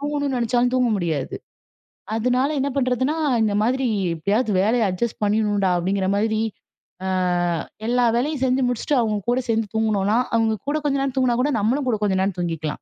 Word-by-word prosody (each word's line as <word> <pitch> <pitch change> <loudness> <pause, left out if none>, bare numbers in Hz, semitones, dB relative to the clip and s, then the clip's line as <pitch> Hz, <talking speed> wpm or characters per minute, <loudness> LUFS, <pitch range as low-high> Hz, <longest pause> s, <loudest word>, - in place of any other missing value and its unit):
தூங்கணும்னு 285 -2 -1
நினைச்சாலும் 245 +1 +1
தூங்க 250 -2 +2
முடியாது. 160 -6 -2 0.8
அதுனால 250 +4 +1
என்ன 275 - 0
பண்றதுன்னா 260 +2 +1 0.3
இந்த 210 -2 +1
மாதிரி 255 +3 +1 0.3
எப்படியாவது 210 +8 0
வேலையை 225 +4 +2
அட்ஜஸ்ட் 210 +6 -3
பண்ணிடனும்டா 205 -2 +1
அப்படிங்கிற 190 +2 -1
மாதிரி, 215 +1 0 0.7
ஆ - - -1 0.8
எல்லா 245 0 +2
வேலையும் 280 +1 -1
செஞ்சு 255 +1 +1
முடிச்சுட்டு 245 +4 -1
அவங்க 215 -2 0
கூட 245 +1 +2
சேர்ந்து 225 -1 +1
தூங்கணும்னா 215 -1 +1 0.2
அவங்க 225 -1 +2
கூட 300 - +1
கொஞ்ச 280 -1 +1
நேரம் 275 -2 -2
தூங்கினா 245 -2 +2
கூட 290 +3 +1
நம்மளும் 255 +6 0
கூட 220 -3 0
கொஞ்ச 200 -2 +1
நேரம் 190 -1 -1
தூங்கிக்கலாம். 165 -3 -3
230 Hz, 165 wpm, -22 LUFS, 205-255 Hz, 0.8 s, தூங்க